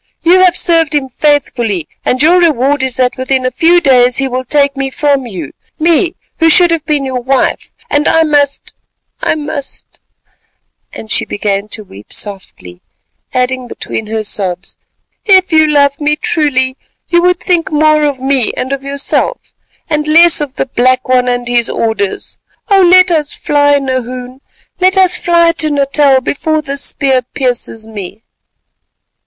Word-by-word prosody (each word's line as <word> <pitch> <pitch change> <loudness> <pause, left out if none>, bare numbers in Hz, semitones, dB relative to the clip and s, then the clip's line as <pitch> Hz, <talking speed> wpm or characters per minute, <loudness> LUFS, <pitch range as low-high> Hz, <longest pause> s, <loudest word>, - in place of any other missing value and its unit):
You 355 +2 +4
have 365 -1 +3
served 325 -3 +1
him 270 -2 -1
faithfully, 245 - -1 0.2
and 255 +3 0
your 350 +4 +5
reward 290 -4 +1
is 260 -2 -1
that 255 +1 0
within 260 0 -1
a 255 - 0
few 340 +4 +3
days 250 -5 +3
he 275 - 0
will 255 0 -3
take 280 +1 +1
me 270 0 -2
from 280 -2 -1
you—me, 310 - -2 0.2
who 325 - +4
should 345 +2 +4
have 330 -3 -1
been 290 -2 0
your 260 -1 -3
wife, 260 +1 -1 0.2
and 290 +1 0
I 325 - +3
must—I 290 0 -3
must——" 290 -2 -7 0.9
And 220 - -10
she - - +2
began 200 0 -3
to 215 0 -6
weep 105 - -15
softly, 140 - -6 0.5
adding 255 0 -2
between 220 -2 -6
her 220 0 -3
sobs, 190 -3 -2 0.5
"if 375 -3 +4
you 315 -1 +4
loved 285 -1 +1
me 300 +1 +1
truly, 270 -5 -1 0.3
you 345 -1 +3
would 360 0 +2
think 350 -2 -1
more 305 0 +2
of 285 -3 -1
me 265 -3 0
and 260 +2 -3
of 275 - -4
yourself, 280 0 -3 0.3
and 300 -1 -2
less 330 +1 +5
of 285 -2 -5
the - - -2
Black 255 0 0
One 250 -1 +2
and 245 -1 -2
his 240 -1 +1
orders. 220 -4 -3 0.3
Oh! 390 -1 +5
let 365 0 +5
us 305 -3 -1
fly, 290 -1 +2
Nahoon, 255 -1 -5 0.4
let 375 +1 +2
us 370 -1 +4
fly 340 -1 +2
to 310 -1 +2
Natal 280 -1 +2
before 310 +4 -2
this 280 -1 -3
spear 265 -2 0
pierces 245 -3 -4
me." 210 -1 -9
275 Hz, 160 wpm, -12 LUFS, 250-310 Hz, 0.9 s, your